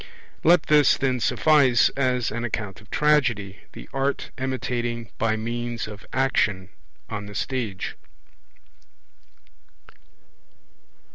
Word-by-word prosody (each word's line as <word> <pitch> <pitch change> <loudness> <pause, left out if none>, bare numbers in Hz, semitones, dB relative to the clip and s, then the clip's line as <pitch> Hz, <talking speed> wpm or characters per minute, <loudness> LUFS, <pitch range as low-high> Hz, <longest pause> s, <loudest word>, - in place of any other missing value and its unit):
Let 170 0 +5
this, 150 -1 +5
then, 130 -2 0
suffice 135 -2 +4
as 125 -4 0
an 120 +2 -3
account 105 -4 -4
of - - -20
Tragedy, 120 -10 +1
the - - -10
art 135 +1 -1
imitating 120 -3 -3
by 110 -1 +1
means 120 +1 -3
of 105 0 -10
action 105 -8 +1 0.4
on 105 -2 -5
the 105 - -10
stage. 115 -8 -3
120 Hz, 100 wpm, -24 LUFS, 110-135 Hz, 0.4 s, Let